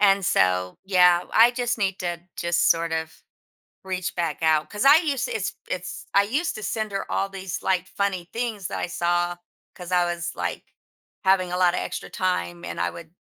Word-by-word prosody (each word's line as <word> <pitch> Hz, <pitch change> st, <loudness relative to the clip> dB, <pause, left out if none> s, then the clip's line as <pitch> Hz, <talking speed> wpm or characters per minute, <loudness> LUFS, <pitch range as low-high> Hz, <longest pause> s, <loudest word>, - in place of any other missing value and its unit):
and 195 Hz, -2 st, +4 dB
so 90 Hz, -, +2 dB
yeah 180 Hz, -2 st, +5 dB
I 230 Hz, +2 st, +7 dB
just 245 Hz, -1 st, -2 dB
need 195 Hz, -2 st, 0 dB
to 175 Hz, -1 st, -3 dB, 0.2 s
just 170 Hz, 0 st, +2 dB
sort 165 Hz, 0 st, +2 dB
of 160 Hz, 0 st, -2 dB, 0.7 s
reach 185 Hz, -1 st, -3 dB
back 165 Hz, -4 st, -2 dB
out, 155 Hz, -1 st, +2 dB
'cause 210 Hz, +3 st, -2 dB
I 285 Hz, +3 st, +9 dB
used 295 Hz, -5 st, 0 dB
to 485 Hz, -, -4 dB
it's -, -, -2 dB
it's -, -, -5 dB
I 200 Hz, -, +6 dB
used 280 Hz, +11 st, -1 dB
to 215 Hz, -, -7 dB
send 215 Hz, +1 st, -2 dB
her 195 Hz, -, -4 dB
all 195 Hz, -, 0 dB
these, 190 Hz, -2 st, -5 dB
like, 185 Hz, -1 st, +1 dB
funny 190 Hz, -3 st, -2 dB
things 225 Hz, -5 st, -3 dB
that -, -, -4 dB
I -, -, -2 dB
saw, 175 Hz, 0 st, 0 dB, 0.4 s
'cause 180 Hz, 0 st, -9 dB
I 180 Hz, -1 st, +3 dB
was, 175 Hz, 0 st, -3 dB
like, -, -, -3 dB, 0.6 s
having 190 Hz, -2 st, +3 dB
a 180 Hz, -, -1 dB
lotta 180 Hz, -1 st, +3 dB
extra -, -, -5 dB
time, 85 Hz, -, -2 dB
and 85 Hz, 0 st, -5 dB
I 85 Hz, 0 st, +1 dB
would 165 Hz, -1 st, -11 dB
180 Hz, 200 wpm, -24 LUFS, 170-200 Hz, 0.7 s, I